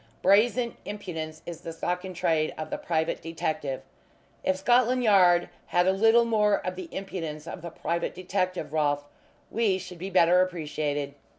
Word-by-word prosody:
Brazen 230 Hz, +5 st, +3 dB
impudence 165 Hz, -7 st, -6 dB
is 170 Hz, -1 st, -7 dB
the 165 Hz, -, -6 dB
stock 180 Hz, +2 st, -2 dB
in 185 Hz, -1 st, -7 dB
trade 165 Hz, -3 st, +1 dB
of 155 Hz, -, -6 dB
the -, -, -2 dB
private 160 Hz, -2 st, -1 dB
detective. 155 Hz, -4 st, -3 dB, 0.6 s
If 190 Hz, -, +1 dB
Scotland 245 Hz, +5 st, +3 dB
Yard 180 Hz, -5 st, +5 dB, 0.2 s
had 175 Hz, 0 st, +2 dB
a 190 Hz, -, +4 dB
little 225 Hz, +4 st, +5 dB
more 210 Hz, -3 st, +3 dB
of 185 Hz, 0 st, -2 dB
the 180 Hz, -2 st, -7 dB
impudence 165 Hz, -6 st, -5 dB
of 170 Hz, -, -7 dB
the 170 Hz, -, -6 dB
private 170 Hz, +1 st, -3 dB
detective, 185 Hz, -4 st, -2 dB
Rolfe, 145 Hz, -2 st, +1 dB, 0.5 s
we 215 Hz, -5 st, +2 dB
should 180 Hz, -2 st, -9 dB
be 190 Hz, +3 st, -4 dB
better 180 Hz, -1 st, +5 dB
appreciated." 150 Hz, -5 st, -2 dB
180 Hz, 165 wpm, -27 LUFS, 160-195 Hz, 0.6 s, Yard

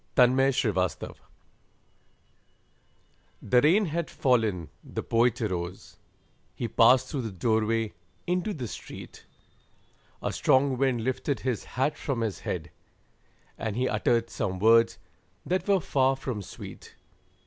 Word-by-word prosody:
THE 125 Hz, -, +8 dB
POET'S 125 Hz, -8 st, +2 dB
HAT -, -, -7 dB, 2.3 s
The 125 Hz, +4 st, +3 dB
rain 185 Hz, +9 st, +4 dB
had 170 Hz, 0 st, -2 dB
fallen, 110 Hz, -, +1 dB
the -, -, -5 dB
Poet 120 Hz, +1 st, +2 dB
arose, 90 Hz, -3 st, -4 dB, 0.6 s
He 120 Hz, -, -3 dB
passed 125 Hz, +3 st, +5 dB
through 135 Hz, -, -3 dB
the 110 Hz, -3 st, -4 dB
doorway 110 Hz, +2 st, 0 dB, 0.3 s
into 180 Hz, +4 st, 0 dB
the 125 Hz, -6 st, -4 dB
street, -, -, -10 dB, 1.0 s
A -, -, -1 dB
strong 130 Hz, 0 st, +3 dB
wind 130 Hz, -4 st, +1 dB
lifted 130 Hz, +2 st, -1 dB
his 125 Hz, -4 st, -2 dB
hat 135 Hz, +4 st, +1 dB
from 130 Hz, -5 st, -2 dB
his 110 Hz, -4 st, -2 dB
head, -, -, -4 dB, 0.9 s
And 110 Hz, -2 st, -3 dB
he 125 Hz, +2 st, +1 dB
uttered 115 Hz, +1 st, +1 dB
some 95 Hz, -1 st, -2 dB
words 115 Hz, +3 st, +4 dB, 0.5 s
that 185 Hz, +3 st, -1 dB
were 200 Hz, -1 st, +4 dB
far 135 Hz, -4 st, +2 dB
from 130 Hz, -5 st, -4 dB
sweet. 95 Hz, -, -11 dB
120 Hz, 125 wpm, -27 LUFS, 110-135 Hz, 2.3 s, THE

